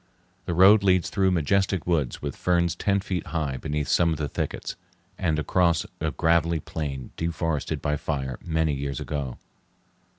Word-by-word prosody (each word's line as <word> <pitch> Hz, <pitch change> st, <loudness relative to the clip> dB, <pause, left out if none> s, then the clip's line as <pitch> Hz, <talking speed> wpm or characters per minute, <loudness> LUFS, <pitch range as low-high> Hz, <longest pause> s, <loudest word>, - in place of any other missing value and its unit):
The 85 Hz, -, -2 dB
road 100 Hz, +4 st, +7 dB
leads 95 Hz, -3 st, +2 dB
through 95 Hz, -2 st, +2 dB
majestic 95 Hz, +2 st, +1 dB
woods 80 Hz, -8 st, 0 dB
with 70 Hz, -3 st, -3 dB
ferns 85 Hz, -1 st, +1 dB
ten 100 Hz, -1 st, +1 dB
feet 90 Hz, -3 st, -3 dB
high 75 Hz, -5 st, -2 dB
beneath 75 Hz, 0 st, -2 dB
some 85 Hz, -1 st, +3 dB
of 80 Hz, -, -1 dB
the 75 Hz, -1 st, -2 dB
thickets, -, -, -4 dB, 0.4 s
and 80 Hz, -4 st, 0 dB
across 85 Hz, +1 st, +2 dB
a 80 Hz, -, 0 dB
gravelly 85 Hz, +3 st, +2 dB
plain 70 Hz, -4 st, -5 dB
deforested 80 Hz, -2 st, -2 dB
by 75 Hz, 0 st, 0 dB
fire 65 Hz, -4 st, -3 dB
many 80 Hz, -2 st, 0 dB
years 70 Hz, -1 st, -3 dB
ago. 70 Hz, -4 st, -4 dB
80 Hz, 160 wpm, -26 LUFS, 75-90 Hz, 0.4 s, road